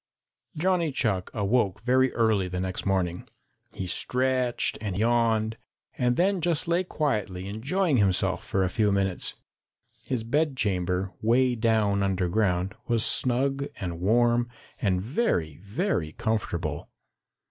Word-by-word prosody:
Johnny 175 -1 +1
Chuck 100 -8 0
awoke 105 -1 0
very 130 +1 +3
early 110 -5 +2
the 90 0 -4
next 95 +1 -3
morning. 90 -3 -1 0.5
He 95 - -4
stretched 125 +6 0
and 100 -4 -3
yawned 115 -1 +1 0.4
and 125 -1 +1
then 190 +3 +2
just 165 -2 0
lay 170 +2 +2
quietly 105 - -2
enjoying 140 - 0
himself 95 -3 +1
for 95 - 0
a 95 - +1
few 105 -1 +2
minutes. 95 -2 -1 0.7
His 125 -4 -1
bedchamber, 100 - 0
way 125 +3 +3
down 110 -3 +1
underground, 95 0 0
was 115 -2 +1
snug 135 +3 +1
and 85 -3 -4
warm 120 +5 +2 0.3
and 95 -3 +1
very, 95 - -1
very 100 - -2
comfortable. 85 -9 -2
110 Hz, 125 wpm, -26 LUFS, 95-130 Hz, 0.7 s, very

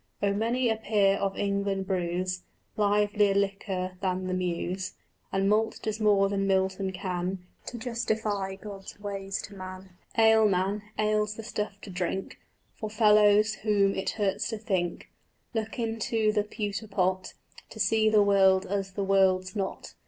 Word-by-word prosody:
Oh 200 -1 +1
many 235 +4 +1
a 225 -1 +1
peer 205 -3 +2
of 195 -1 -2
England 200 -1 -1
brews 185 0 -1 0.3
Livelier 205 -1 +2
liquor 195 -2 -1
than 185 -1 -1
the 185 - -2
Muse, 185 +1 -2 0.4
And 195 0 +1
malt 220 +2 +2
does 215 0 -2
more 205 -2 +4
than 195 0 -1
Milton 190 0 +1
can 185 -1 -3 0.2
To 245 - -5
justify 220 -4 -2
God's 195 0 -10
ways 195 -1 -4
to 205 - -9
man. 185 0 -9 0.3
Ale, 220 -1 +6
man, 195 +2 0 0.2
ale's 215 0 +1
the 225 - -7
stuff 210 -2 -4
to 200 - -9
drink 180 +1 -3 0.3
For 215 - -5
fellows 210 0 +5
whom 200 -2 +3
it 190 - -2
hurts 200 -1 0
to 220 - -3
think: 185 -5 -2 0.4
Look 220 +1 -3
into 225 -1 0
the 210 -1 0
pewter 210 0 -4
pot 185 -2 -1 0.3
To - - -11
see 220 -1 +3
the 215 -1 +5
world 190 -2 +4
as 195 0 -3
the 200 - -2
world's 190 -1 +2
not. 195 -2 -4
200 Hz, 155 wpm, -28 LUFS, 190-215 Hz, 0.4 s, Ale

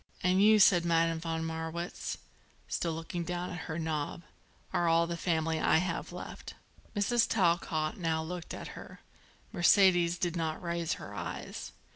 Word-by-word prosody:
"And 185 +2 +3
you," 215 +1 +7
said 185 -4 +6
Madame 165 -1 +2
von 165 0 -3
Marwitz, 160 +2 -4 0.5
still 165 -2 -1
looking 165 +2 -4
down 180 +1 -3
at 175 -2 -6
her 160 - -2
knob, 160 0 -3 0.5
"are 175 - +2
all 165 0 +4
the 170 0 -3
family 160 -2 0
I - - +4
have 170 0 -2
left." - - -8 0.4
Mrs. 225 +3 +2
Talcott 170 -5 +1
now 160 -2 0
looked 175 +1 -6
at - - -7
her. - - -11 0.5
Mercedes 175 -2 +5
did 175 -1 -1
not 160 -2 -2
raise 170 -2 -2
her 100 - -8
eyes. 90 -4 -6
170 Hz, 155 wpm, -31 LUFS, 160-175 Hz, 0.5 s, you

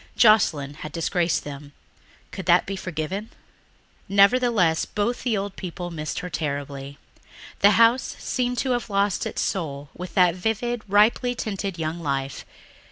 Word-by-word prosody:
Joscelyn 155 - +4
had 155 - -7
disgraced 170 0 0
them; 145 0 -9 0.6
could 190 - -7
that 175 0 +5
be 195 - -4
forgiven? 185 +3 -4 0.8
Nevertheless 200 -4 +4
both 215 +4 -2
the 235 -4 0
old 195 0 -4
people 175 -1 -6
missed 155 -2 -4
her 180 - -6
terribly. 140 -2 -4 0.6
The 205 0 +5
house 230 +3 +4
seemed 250 -1 -2
to 260 - +1
have 240 -2 -1
lost 200 -1 +1
its - - -2
soul 145 -6 -3
with 180 -1 -8
that 180 -2 +5
vivid, 220 +5 -2
ripely 220 +5 +3
tinted 200 -5 -4
young 160 +1 -3
life. 140 -4 -3
185 Hz, 145 wpm, -24 LUFS, 155-215 Hz, 0.8 s, that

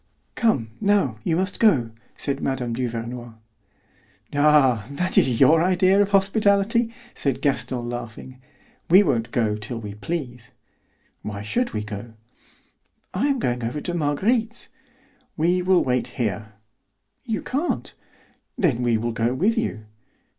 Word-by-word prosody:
"Come, 135 - +1
now, 195 - +2
you 165 - +1
must 190 +3 -1
go," 135 - +3 0.3
said 140 -1 -2
Mme. 125 -3 -2
Duvernoy. 120 0 -4 1.0
"Ah, 140 -7 +4
that 180 +6 -2
is 125 -3 +3
your 155 +4 +6
idea 185 +2 +4
of 200 - +1
hospitality," 200 +3 +2 0.2
said 135 -2 -1
Gaston, 125 -3 -1
laughing; 120 +2 -7 0.5
"we 190 +4 +7
won't 120 - 0
go 110 -3 0
till 105 +3 -6
we 105 -2 -7
please." 125 +1 -5 0.7
"Why 105 -1 -6
should 240 - -1
we 105 - -2
go?" 105 +2 -8 1.0
"I - - +1
am 280 -2 +1
going 125 - -1
over 120 +6 -2
to 175 - -3
Marguerite's." 215 - 0 0.7
"We 175 +3 +2
will 180 0 +3
wait 125 -1 0
here." 110 -2 -2 0.7
"You 225 -5 -3
can't." 290 +7 -2 0.6
"Then 140 - +1
we 120 -2 +2
will 115 +2 -2
go 115 +2 0
with 205 +11 +2
you." 220 - -2
135 Hz, 135 wpm, -23 LUFS, 115-190 Hz, 1.0 s, we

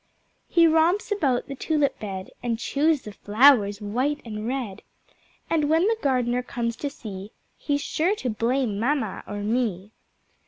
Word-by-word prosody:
He 335 -1 +5
romps 330 +7 +3
about 280 -13 +1
the 275 - -5
Tulip 290 +1 0
bed, 190 -3 -6
And 235 -2 -1
chews 290 +5 +1
the 210 - -8
Flowers 210 -1 +4
white 255 +8 -1
and 215 -1 -5
red, 240 -6 -3 0.7
And 305 -3 +1
when 320 +2 +4
the 450 0 +1
Gardener 250 -2 +1
comes 235 -2 -3
to 285 - -3
see 205 -6 -9 0.2
He's 285 -1 -1
sure 355 +7 0
to 255 - -3
blame 230 -1 0
mamma 240 -4 -1
or 205 - -5
me. 210 -3 -1
250 Hz, 155 wpm, -25 LUFS, 215-295 Hz, 0.7 s, He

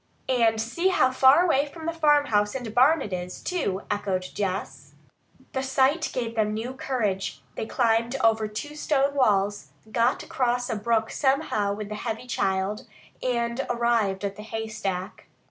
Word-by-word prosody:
"And 230 -3 +3
see 240 +12 0
how 260 -9 +3
far 265 +6 +6
away 290 -4 +2
from 320 +2 -10
the 335 - -1
farmhouse 290 -10 +3
and 240 -5 -5
barn 275 +6 +5
it 200 - -6
is, 180 0 -5
too!" 210 - -2
echoed 200 -3 -1
Jess. 195 -1 -4 0.6
The 265 - -2
sight 270 +4 +2
gave 235 -2 -3
them 215 -2 0
new 235 +4 -4
courage. 205 - -2
They 220 - -4
climbed 235 0 +1
over 225 -4 +2
two 215 +8 -6
stone 280 -2 +1
walls, 205 -6 +1 0.2
got 235 +2 +1
across 245 -1 -1
a - - -1
brook 225 +1 0
somehow 265 -8 +1
with 210 -1 -6
the - - -4
heavy 225 +3 -4
child, 195 -3 -1 0.3
and 235 0 -1
arrived 230 -5 +1
at 200 0 -4
the - - -7
haystack. 215 -4 -5
230 Hz, 160 wpm, -26 LUFS, 210-265 Hz, 0.6 s, far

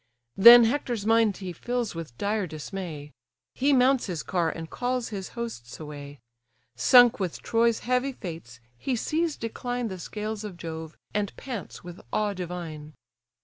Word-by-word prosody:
Then 235 +4 +10
Hector's 235 -3 -1
mind 225 -3 +3
he 185 -2 -6
fills 240 +5 -3
with 165 -8 -8
dire 205 -1 -1
dismay; 155 -1 -7 0.4
He 280 +2 +2
mounts 260 -1 +4
his 175 -5 -4
car, 175 -4 0
and 165 0 -6
calls 250 +4 -2
his 195 -3 -5
hosts 225 - -6
away; 145 -2 -8 0.6
Sunk 240 - +6
with 185 -4 -3
Troy's 230 0 +2
heavy 250 +3 0
fates, 160 - -8 0.2
he 260 - -1
sees 315 +6 -1
decline 245 +1 -3
The 190 -1 -6
scales 215 +4 -5
of 200 -5 -7
Jove, 160 -1 -7 0.2
and 205 -1 -2
pants 245 -8 -7
with 175 -1 -10
awe 210 -1 0
divine. 170 -4 -6
205 Hz, 150 wpm, -27 LUFS, 165-240 Hz, 0.6 s, Then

